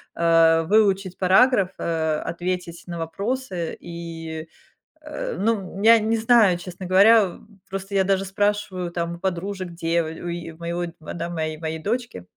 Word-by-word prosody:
э, 165 -1 +4
выучить 195 -2 +2
параграф, 195 +2 +4
э, 160 -2 -1
ответить 175 0 -4
на 170 -1 -5
вопросы 200 -1 -3
и, 165 -2 -7 0.5
э, 300 0 -5
ну, 200 -3 -1
я 230 +1 +8
не 220 +1 0
знаю, 225 -5 +4
честно 180 +1 -8
говоря. 200 0 +5 0.3
Просто 195 +1 -6
я 190 - +4
даже 195 0 +1
спрашиваю 195 -2 -1
там 170 0 -3
у - - -13
подружек, 185 +1 -3
дево 170 -1 -1
у 160 +2 -7
е 170 -1 -5
у - - -18
моего, 170 +1 -3 0.2
да 170 +2 -5
моей 155 -2 -3
моей 160 0 -4
дочке, 230 - -3
180 Hz, 150 wpm, -23 LUFS, 170-200 Hz, 0.5 s, я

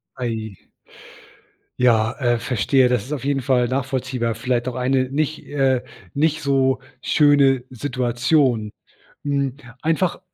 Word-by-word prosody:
Ai. 115 -4 -4 1.3
Ja, 115 -3 +3
äh, 120 -3 +2
verstehe. 125 +3 +2
Das 125 -4 +1
ist 140 - -5
auf 140 - -4
jeden 140 -1 0
Fall 125 -1 +2
nachvollziehbar. 130 -2 -2
Vielleicht 120 +2 -1
auch 125 - -3
eine 130 0 +1
nicht 155 +2 -2
äh, 135 -3 +1 0.3
nicht 155 +2 +1
so 135 -2 +2 0.2
schöne 140 -4 +4
Situation. 125 -2 0 0.5
Hm, 140 -2 -1 0.3
einfach 165 +3 0
130 Hz, 120 wpm, -21 LUFS, 120-140 Hz, 1.3 s, schöne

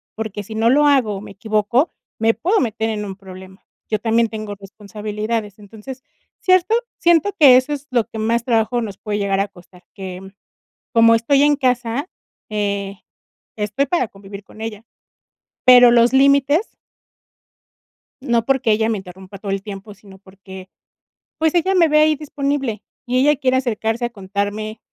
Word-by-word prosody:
porque 215 -2 -5
si 220 +2 -9
no 225 +1 +2
lo 295 +3 +4
hago 255 -8 +2
o - - -8
me - - -11
equivoco, 215 - 0 0.3
me 225 +1 +3
puedo 360 - +1
meter 225 -2 -2
en 210 -1 -3
un 195 -1 -7
problema, 190 -1 -13 0.3
yo 215 - 0
también 230 +1 +1
tengo 215 -2 -6
responsabilidades". 210 +1 -5
Entonces, 220 +6 -11 0.4
cierto 370 +3 +3 0.2
siento 345 +3 +3
que 270 -5 +8
eso 260 +3 0
es 290 0 -7
lo 240 -3 +1
que 225 -1 -8
más 230 +2 0
trabajo 235 0 +1
nos 205 -4 -6
puede 210 -1 -4
llegar 195 -1 0
a 200 - -1
costar, 180 -1 -19
que, 190 -2 -8
mm, 195 0 -12 0.6
como 230 -1 +6
estoy 275 +5 +2
en 295 0 +4
casa, 250 +3 -1 0.4
eh, 200 -2 -2 0.6
estoy 210 +6 -1
para 300 -6 0
convivir 200 0 -11
con 215 - -15
ella, 220 0 -6 0.8
pero 245 -1 +8
los 240 +1 +4
límites 280 - +3 1.5
no 235 -3 0
porque 265 -3 +1
ella 220 +1 +1
me 220 - -1
interrumpa 190 +1 -11
todo 200 0 -6
el 195 0 -2
tiempo, 200 0 -9
sino 195 -2 -17
porque, 190 -1 -13 0.7
pues, 315 -1 +1
ella 375 +3 +2
me 335 -3 +4
ve 305 0 +4
ahí 310 0 +4
disponible, 280 -6 -3 0.2
y 250 +1 0
ella 295 +3 +4
quiere 260 -2 +1
acercarse 235 -2 -1
a - - -3
contarme 205 +1 -4
225 Hz, 170 wpm, -19 LUFS, 205-260 Hz, 1.5 s, que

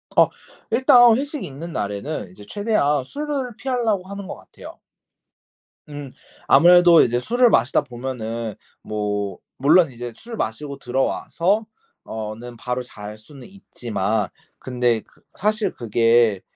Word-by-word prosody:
어 - - +6 0.4
일단 245 -3 +6
회식이 285 +1 -4
있는 155 +5 -8
날에는 100 - -4
이제 100 +3 -14
최대한 205 - +1
술을 280 - -4
피하려고 230 -8 -1
하는 200 0 -7
것 - - -6
같아요. - - -13 1.1
음. 145 -2 -8 0.4
아무래도 175 +3 +7
이제 120 +1 +2
술을 245 - +3
마시다 145 - +3
보면은 115 -3 -5 0.3
뭐 105 -2 -3 0.2
물론 160 +4 +5
이제 120 -1 -7
술을 230 - -9
마시고 140 - -4
들어와서 165 - 0 0.4
어 110 -1 -5
는 120 +2 -10
바로 125 +2 -3
잘 105 -3 -9
수는 130 +4 -14
있지만 110 - -3 0.3
근데 125 -3 0
그 - - -28
사실 210 -1 0
그게 115 -2 +2
135 Hz, 270 characters per minute, -22 LUFS, -, 1.1 s, 아무래도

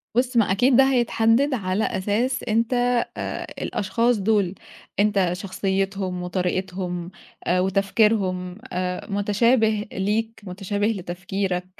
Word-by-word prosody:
بُص، 250 0 +1
ما 215 -4 +4
أكيد 245 +7 +4
ده 270 - +7
هيتحدّد 240 +2 +3
على 200 -3 0
أساس 215 +8 0
أنت 225 +3 +1 0.4
آآ - - -4 0.2
الأشخاص 230 +4 +1
دُول 200 -2 +1 0.4
أنت 200 -3 +3
شخصيّتهم 190 0 -2
وطريقتهم 180 -1 -2 0.4
آآ 180 +1 +3
وتفكيرهم 190 -1 +1 0.2
آآ 180 0 -2
متشابه 215 +2 +2
ليك، 220 +4 -1
متشابه 200 +2 -2
لتفكيرك، 185 -2 -2
200 Hz, 105 wpm, -23 LUFS, 185-225 Hz, 0.4 s, ده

